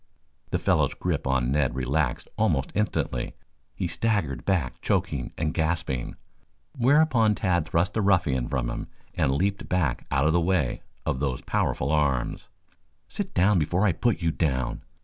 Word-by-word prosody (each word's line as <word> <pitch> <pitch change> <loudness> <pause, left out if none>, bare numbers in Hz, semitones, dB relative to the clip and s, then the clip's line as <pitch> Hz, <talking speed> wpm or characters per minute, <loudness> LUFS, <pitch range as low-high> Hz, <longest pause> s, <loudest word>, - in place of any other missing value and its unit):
The - - +1
fellow's - - +1
grip - - -2
on 65 -2 +1
Ned 70 -4 +1
relaxed 65 +1 -1
almost - - +1
instantly. 105 - -1 0.4
He - - -2
staggered 85 - -1
back 90 -10 0
choking 65 -3 -1
and 75 -1 -1
gasping, 80 -6 -1 0.6
whereupon 125 -4 +4
Tad 90 -5 +1
thrust 85 +4 +1
the 110 - 0
ruffian 80 -11 +2
from 65 -4 -1
him - - -5 0.3
and 65 - +1
leaped 95 +8 -1
back 80 -9 0
out 70 0 +2
of 80 - +3
the 85 - +3
way 85 -7 0 0.2
of 65 - -1
those 65 -3 -1
powerful 65 +3 0
arms. 70 -5 0 0.6
"Sit - - -5
down 95 +1 +4
before 90 +6 +1
I 100 - +4
put 110 +1 0
you 80 - +2
down!" 65 -6 -1
80 Hz, 155 wpm, -26 LUFS, 65-95 Hz, 0.6 s, whereupon